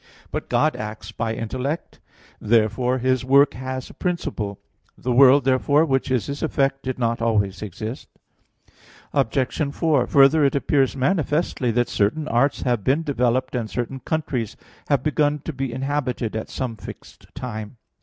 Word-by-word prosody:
But - - -4
God - - +2
acts 105 +1 -6
by 115 -1 -2
intellect: 130 +8 -4 0.4
therefore 115 +3 +2
His 130 0 +1
work 140 +2 +5
has 130 +1 -5
a - - -13
principle. 150 - -3 0.4
The 125 - -2
world, 135 +2 +7
therefore, 140 +4 +3
which 135 -3 0
is 125 -6 +1
His 140 0 -5
effect, 135 -3 0
did 130 -1 -4
not 115 -1 -1
always 100 -4 0
exist. 110 +4 -6 1.1
Obj. 135 +5 0
4: 155 -7 +2
Further, 140 +3 +5
it 140 - +2
appears 140 -1 +2
manifestly 150 -3 0
that 120 +1 +2
certain 130 +10 0
arts 130 +5 +1
have 120 -5 0
developed, 130 -3 +1
and 120 -4 -2
certain 120 +3 -3
countries 130 -5 -3 0.3
have 140 -3 +2
begun 150 -1 +1
to 165 - -3
be 135 -1 -3
inhabited 130 -3 -2
at 110 - -4
some 120 -4 -4
fixed - - -12
time. 120 -4 -6
130 Hz, 150 wpm, -23 LUFS, 115-140 Hz, 1.1 s, world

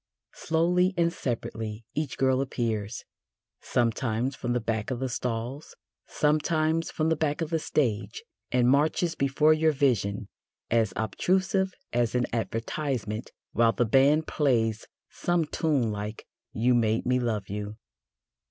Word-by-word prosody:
Slowly 180 +3 +1
and 170 0 +2
separately 110 -5 -4
each 150 -2 -3
girl 130 0 +2
appears, 115 -5 -2 0.5
sometimes 120 +2 0
from 120 -2 -2
the 125 - +1
back 110 -2 -2
of 130 -2 -2
the 130 0 -2
stalls, 125 +4 -4 0.3
sometimes 155 +2 +1
from 155 0 0
the 160 - +3
back 150 -1 -1
of 165 0 -2
the 165 - +1
stage, 115 -8 -1 0.3
and 125 -1 +3
marches 155 +5 +2
before 140 +3 +3
your 155 0 +3
vision 110 -8 0 0.4
as 110 -3 +3
obtrusive 190 - 0 0.2
as 120 0 +1
an 125 0 +2
advertisement, 115 -1 -3 0.2
while 115 0 +3
the 120 - +1
band 140 +7 +4
plays 115 -6 +1 0.2
some 175 -2 0
tune 145 -8 0
like 105 +1 -5 0.3
"You 120 +3 +2
made 115 -2 +2
me 125 0 +2
love 110 -5 -1
you." 105 +1 -5
125 Hz, 135 wpm, -27 LUFS, 115-155 Hz, 0.5 s, band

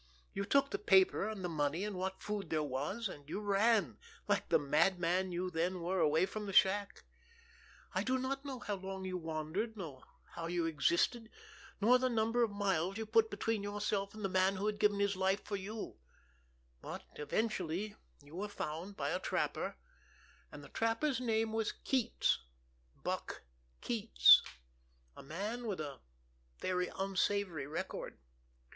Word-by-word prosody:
You 200 +1 -2
took 275 +5 +3
the 400 - -1
paper 380 - +4
and 200 -4 -4
the - - +1
money 155 +1 0
and 210 -2 -4
what 190 +1 -3
food 205 -4 -3
there 155 -1 +1
was, 145 - -2
and 145 -5 -10
you 195 - -2
ran, 205 - +2 0.3
like - - +1
the - - +6
madman 180 +5 +2
you 180 +1 -2
then 175 +2 0
were, 180 +2 -1
away 160 +3 +4
from 210 +2 -5
the 195 - -4
shack. 200 +2 +3 0.9
I - - +1
do 260 0 +1
not 270 +1 -2
know 275 -2 -5
how 210 -4 -4
long 190 0 -6
you 185 -1 -3
wandered, 165 +8 -3
nor 150 -9 -7 0.3
how 165 -1 -4
you 170 -1 0
existed, 170 - +1 0.5
nor 240 +5 +5
the 255 0 +2
number 230 +1 +1
of 230 - +3
miles 195 -2 0
you 220 - -3
put 220 0 +4
between 210 +1 -1
yourself 205 0 -2
and 215 -2 -4
the - - +3
man 185 +1 +3
who 195 +2 -2
had 210 -1 -1
given 205 -1 +3
his 200 0 +2
life 190 +1 +1
for 205 - -3
you; 200 - -6 0.8
but - - -6
eventually 195 +3 -1 0.3
you 145 +3 -13
were 205 +3 -3
found 180 +2 -5
by - - -1
a - - 0
trapper, - - -1 0.7
and - - -10
the - - -12
trapper's 230 +4 0
name 225 -2 +1
was 225 -1 0
Keats, 250 -4 +2 0.6
Buck - - -3 0.4
Keats, 230 -2 +6 0.7
a - - -10
man 205 - -4
with 200 -5 -2
a 140 -4 -5 0.6
very 180 -1 0
unsavory 195 -5 0
record. 155 - -5
195 Hz, 165 wpm, -35 LUFS, 175-220 Hz, 0.9 s, the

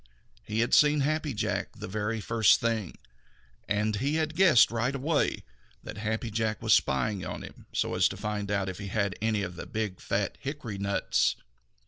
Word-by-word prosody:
He 105 - -2
had 120 - 0
seen 150 0 +5
Happy 155 +1 0
Jack 110 - -2
the - - -7
very 105 +3 -2
first 115 0 +4
thing, 115 -6 -2 0.7
and 105 +1 +1
he 140 +7 0
had 160 0 -1
guessed 170 -13 +6
right 120 +4 -1
away 145 +3 0 0.4
that 105 - -8
Happy 110 +1 -2
Jack 110 0 -1
was - - +3
spying 95 +9 +1
on - - -5
him - - -12
so - - -1
as - - +4
to - - -6
find 105 -1 -3
out 100 -2 0
if 95 0 -5
he 100 - -5
had 100 0 -1
any 110 -2 +1
of 90 -2 -6
the - - -7
big, 105 -4 -3
fat 100 0 -2
hickory 135 -8 -5
nuts. 100 0 +1
110 Hz, 185 wpm, -28 LUFS, 100-130 Hz, 0.7 s, guessed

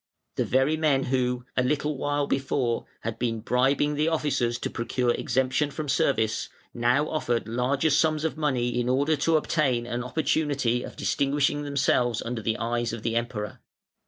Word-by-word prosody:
The - - +1
very 135 +4 +2
men 145 -4 +2
who, 125 -1 0
a - - +3
little 150 +3 0
while 145 +1 0
before, 135 -3 -1
had 115 0 -4
been 115 -2 -1
bribing 135 +5 +2
the 150 +2 +1
officers 140 -7 0
to - - -3
procure 120 +1 0
exemption 130 +4 0
from 150 +1 -5
service, 115 -4 +1 0.2
now 125 +5 +2
offered 120 -7 -1
larger 130 +6 +1
sums 155 +1 +2
of 160 - -1
money 125 -6 0
in 120 - -1
order 140 +5 +2
to 160 +3 +3
obtain 135 -6 0
an 120 0 -3
opportunity 135 -3 0
of - - -8
distinguishing 145 +1 +1
themselves 135 -5 +1
under 115 -1 -4
the 110 +1 -1
eyes 120 0 -1
of 115 -2 -6
the 115 - -1
Emperor. 115 -3 -3
130 Hz, 165 wpm, -26 LUFS, 120-145 Hz, 0.2 s, a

